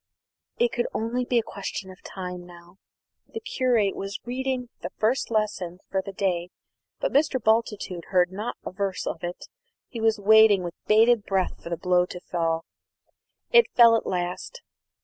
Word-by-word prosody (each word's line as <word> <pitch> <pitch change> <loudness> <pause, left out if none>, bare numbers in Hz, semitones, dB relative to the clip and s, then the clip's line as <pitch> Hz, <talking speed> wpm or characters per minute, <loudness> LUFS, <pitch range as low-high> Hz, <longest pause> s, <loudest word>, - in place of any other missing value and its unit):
It 480 0 +2
could 240 - -1
only 240 +3 -1
be 245 - +1
a 230 - +3
question 195 -2 -6
of 185 - -15
time 180 -2 -7
now. 175 +1 -15 0.5
The 450 - -6
curate 250 - +1
was 195 +1 -5
reading 255 0 -2
the - - -4
first 230 +4 +1
lesson 210 -5 -1
for 190 - +1
the 195 - -6
day, 180 -3 -1 0.5
but - - -1
Mr. 285 -1 +3
Bultitude 220 -6 0
heard 180 -1 +2
not 210 +5 -4
a - - -4
verse 195 0 -3
of 165 - -4
it. 175 +1 -5 0.4
He 230 - -6
was 225 0 +3
waiting 210 -1 +6
with 175 -1 -5
bated 225 +1 +5
breath 190 -2 -1
for - - -8
the 170 - -2
blow 180 +1 +2
to 180 - -8
fall. 165 -2 -2 0.9
It 475 -1 +6
fell 235 -2 +8
at 225 - -1
last. 180 - -4
200 Hz, 170 wpm, -25 LUFS, 180-235 Hz, 0.9 s, fell